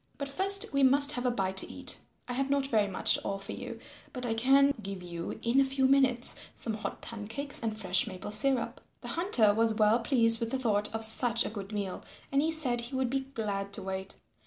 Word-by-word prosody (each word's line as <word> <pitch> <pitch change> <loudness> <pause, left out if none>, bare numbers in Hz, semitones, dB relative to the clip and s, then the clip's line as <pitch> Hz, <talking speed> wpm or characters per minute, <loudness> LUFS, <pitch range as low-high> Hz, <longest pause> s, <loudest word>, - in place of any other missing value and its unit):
"But 280 -1 -5
first 385 +3 +4
we 275 - +1
must 280 +2 +6
have 250 -3 -2
a - - +3
bite 190 -5 -3
to - - 0
eat. - - -2 0.3
I 250 - -5
have 270 +2 -2
not 280 -1 0
very 220 -6 +1
much 190 - +3
to - - 0
offer 195 +1 -5
you, - - -8 0.4
but 250 -1 -3
I 230 - -1
can 275 +4 +3
give 195 -2 -7
you 170 -1 -7
in 240 +4 +2
a - - +4
few 270 0 -1
minutes 260 -2 +4 0.2
some 225 - -4
hot 215 - -6
pancakes 230 +6 -4
and 220 -2 -4
fresh 185 +1 +1
maple 190 0 -8
syrup." 245 +3 -1 0.2
The - - -7
Hunter 260 - +2
was 225 0 +1
well 215 +1 +3
pleased 230 -2 +4
with 230 - -3
the 265 - -2
thought 210 -5 0
of 225 0 +2
such 230 +1 +2
a - - -5
good 200 -2 -8
meal 200 -3 -5 0.3
and 275 0 +2
he 320 +2 0
said 260 -7 +3
he 240 +3 -6
would 260 -2 -1
be 270 - 0 0.2
glad 200 -3 -4
to 200 - -5
wait. 190 0 -6
230 Hz, 230 wpm, -29 LUFS, 210-270 Hz, 0.4 s, must